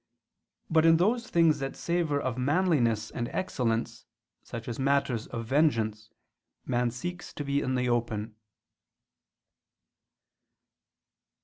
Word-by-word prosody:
But 160 -1 +3
in 165 0 +6
those 230 +7 +1
things 165 -2 +4
that 135 0 -4
savor 170 -4 0
of 130 -4 -2
manliness 130 - +1
and 120 0 -3
excellence, 115 -9 -2 0.3
such 115 -1 -8
as 120 0 -5
matters 135 -4 +1
of 115 0 -5
vengeance, 110 -6 +1 0.6
man 120 -1 +1
seeks 175 +9 -6
to 145 - -5
be 140 0 0
in 130 0 -1
the 125 0 0
open. 115 -2 -1
130 Hz, 115 wpm, -28 LUFS, 115-160 Hz, 0.6 s, in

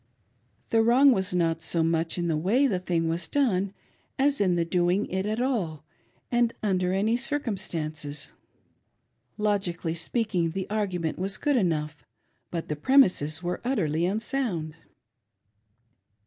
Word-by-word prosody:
The 225 - +3
wrong 250 +5 +6
was 190 -6 0
not 165 -2 0
so 165 0 0
much 165 +1 0
in 175 -1 -1
the 165 - +1
way 200 - +2
the 195 -9 +1
thing 170 -2 -1
was 165 +1 -1
done' 200 -9 +1 0.5
as 280 -2 +2
in 185 -3 +3
doing 175 +3 +1
it 190 +2 -1
at 215 +2 -1
all 195 - -1 0.5
and 240 -1 +2
under 185 -3 +1
any 205 +5 +1
circumstances. 175 - -2 1.1
Logically 195 -6 -1
speaking, 175 -1 -1
the 190 0 -3
argument 185 -7 -2
was 195 +2 -1
good 290 +4 +1
enough, 155 -8 -1 0.5
but 170 -2 -4
the 150 - -2
premises 180 - +3
were 175 +1 -3
utterly 175 - 0
unsound. 200 - -2
185 Hz, 135 wpm, -27 LUFS, 165-225 Hz, 1.1 s, wrong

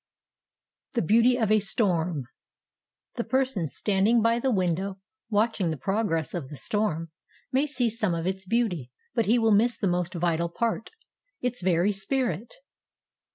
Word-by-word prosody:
THE 235 - +1
BEAUTY 235 +7 +4
OF 220 -4 +1
A 215 - +5
STORM. 180 - 0 0.9
The 235 - 0
person 260 -11 0
standing 205 - +2
by 230 +1 +3
the 265 - 0
window 190 -2 0 0.3
watching 210 -4 +1
the 160 - -2
progress 180 - -1
of 155 -7 -4
the 150 - -8
storm 165 -6 -1 0.4
may 270 +3 +2
see 255 -4 0
some 215 -5 0
of 165 0 -3
its 190 0 -3
beauty, 185 - 0 0.2
but 230 -4 +1
he 230 +4 +4
will 225 -2 +3
miss 230 +4 +3
the 200 - 0
most 180 0 -1
vital 170 0 0
part—its 245 - -4
very 180 +2 +2
spirit. 210 - -2
205 Hz, 150 wpm, -27 LUFS, 175-235 Hz, 0.9 s, A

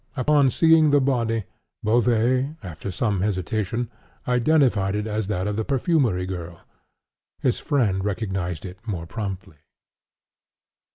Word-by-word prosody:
Upon 140 +1 +4
seeing 160 +2 +5
the 145 0 +5
body, 115 -5 0 0.4
Beauvais, 120 +5 +2
after 90 +1 -6
some 100 0 -1
hesitation, 105 +4 -2 0.4
identified 125 -6 +2
it 105 0 -2
as 110 -2 -2
that 95 -3 -1
of 105 0 -2
the 110 - 0
perfumery 130 - +1
girl. 85 -2 -6 0.8
His 125 - +1
friend 110 - +1
recognized 95 -5 -3
it 90 0 -9
more 90 -6 -3
promptly. 95 -3 -6
110 Hz, 120 wpm, -24 LUFS, 95-125 Hz, 0.8 s, seeing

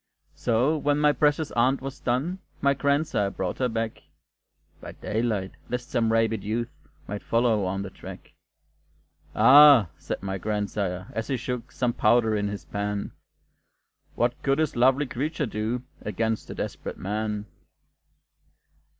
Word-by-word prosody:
So, 125 +7 +1
when 145 0 +1
my 150 0 +4
precious 150 +1 +1
aunt 130 +3 +2
was 135 +1 -7
done, 140 +10 -1 0.2
My 140 0 +3
grandsire 140 -7 +1
brought 95 -2 -4
her 125 -1 +1
back 115 0 -3 0.8
(By - - -8
daylight, 110 -3 -2 0.2
lest 125 0 -4
some 115 -3 +1
rabid 115 0 +1
youth 115 +3 -2 0.4
Might 105 0 -5
follow 115 -4 +1
on 95 +1 -2
the 95 - -7
track); - - -11 1.0
"Ah!" 140 - +8
said - - -5
my 95 0 -3
grandsire, 100 -2 -2
as 115 - -3
he 135 - -1
shook 125 0 -5
Some 125 -2 0
powder 110 0 +3
in 105 -1 0
his 100 0 -6
pan, 100 0 -3 1.0
"What 120 +1 0
could 135 0 +1
this 155 -1 0
lovely 130 +4 +4
creature 150 +4 -2
do 110 +2 -3 0.2
Against 110 +1 -2
a - - -6
desperate - - -5
man!" 105 +1 -3
115 Hz, 140 wpm, -26 LUFS, 105-135 Hz, 1.0 s, Ah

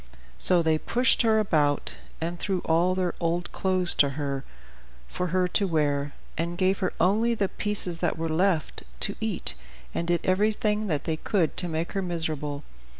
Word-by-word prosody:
So 175 - +8
they 160 -1 +1
pushed 250 +9 +2
her 220 -2 +3
about, 155 -9 +1 0.3
and 170 +1 -4
threw 190 -1 -2
all 170 +3 +1
their 185 -2 -1
old 170 +1 -2
clothes 185 -2 +2
to 140 - +3
her 140 -2 -3 0.6
for 180 - -3
her 180 +1 +1
to 200 +1 +1
wear, 145 -3 -1 0.3
and 170 +1 -3
gave 190 +1 +1
her 190 - -1
only 220 +6 +2
the 200 -3 -1
pieces 200 -5 -3
that - - -1
were 165 0 -2
left 165 0 0 0.2
to - - +6
eat, - - +2 0.4
and 170 - -3
did 175 0 +1
everything 210 +2 0
that 150 -6 -2
they 160 -1 -2
could 170 -2 -1
to 180 - +2
make 165 0 -3
her 195 - -2
miserable. 155 -5 -4
175 Hz, 175 wpm, -26 LUFS, 160-195 Hz, 0.6 s, So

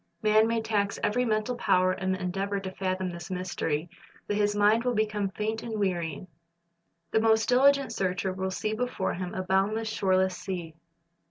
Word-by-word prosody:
Man 215 +1 +5
may 230 -1 0
tax 205 -2 0
every 250 +4 +1
mental 220 +2 0
power 185 -5 +3
in 190 0 -2
the 185 - -1
endeavor 195 +2 -2
to 190 -1 -6
fathom 185 -1 -2
this 170 +1 -8
mystery, 175 -4 -2 0.4
but 205 - -2
his 205 0 +1
mind 210 +3 +4
will 250 -1 0
become 210 -2 0
faint 215 +3 -3
and 225 -2 -4
weary. 175 -5 -1 0.9
The 220 - +3
most 220 0 +3
dihgent 275 +2 +4
searcher 185 0 -1
will 190 0 -2
see 215 +3 -2
before 250 +3 -2
him 180 0 -5
a 185 - -2
boundless, 200 +4 +1
shoreless 190 -3 +1
sea. 175 -4 -5
200 Hz, 175 wpm, -28 LUFS, 185-220 Hz, 0.9 s, Man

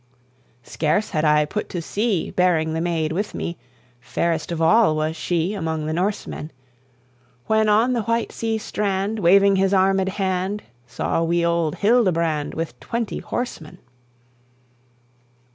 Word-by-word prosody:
"Scarce 160 - -1
had 155 -4 0
I 150 -1 +4
put 210 +8 -4
to 175 - -4
sea, 200 +2 -1
Bearing 165 -3 +2
the 160 - -1
maid 165 -2 -1
with 200 +6 -3
me, 170 - -4 0.4
Fairest 165 +6 -2
of 170 - -3
all 165 +1 +4
was 155 +1 -1
she 170 +3 -1
Among 160 -5 -3
the 155 - -2
Norsemen! 180 -3 -3 1.0
When 220 0 +2
on 225 +5 +3
the 235 - 0
white 230 +2 -1
sea 225 -1 -2
strand, 205 0 -2
Waving 195 +2 +5
his 195 +1 +2
armed 190 0 +3
hand, 190 +1 -2 0.2
Saw 125 +6 -1
we 170 +1 +1
old 170 -2 0
Hildebrand, 170 -9 +1
With 160 -7 -4
twenty 230 -2 -3
horsemen. 240 -11 -5
180 Hz, 140 wpm, -22 LUFS, 160-210 Hz, 1.0 s, Waving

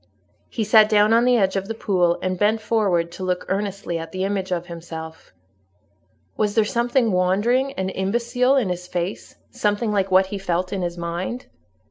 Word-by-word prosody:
He 225 - -2
sat 215 0 +5
down 210 0 +4
on 235 +1 +4
the 250 -1 +4
edge 195 -3 +1
of 195 0 -2
the 225 - -4
pool, 180 -5 +1
and 185 -1 -2
bent 215 +2 +2
forward 200 -7 0
to 180 +2 -8
look 180 -1 -2
earnestly 195 -3 -2
at 165 0 -7
the 185 0 -3
image 195 -1 -2
of 175 -1 -1
himself. 165 -2 -9 1.0
Was 210 -1 0
there 220 - +4
something 240 +1 +1
wandering 205 +9 +1
and 190 -4 -3
imbecile 235 +6 +1
in 245 -8 +1
his 180 0 -4
face—something 205 +4 -3
like 195 -2 0
what 190 0 +5
he 195 +1 -6
felt 180 0 -2
in 195 - -2
his 175 0 -3
mind? 175 +8 -4
195 Hz, 180 wpm, -22 LUFS, 180-220 Hz, 1.0 s, sat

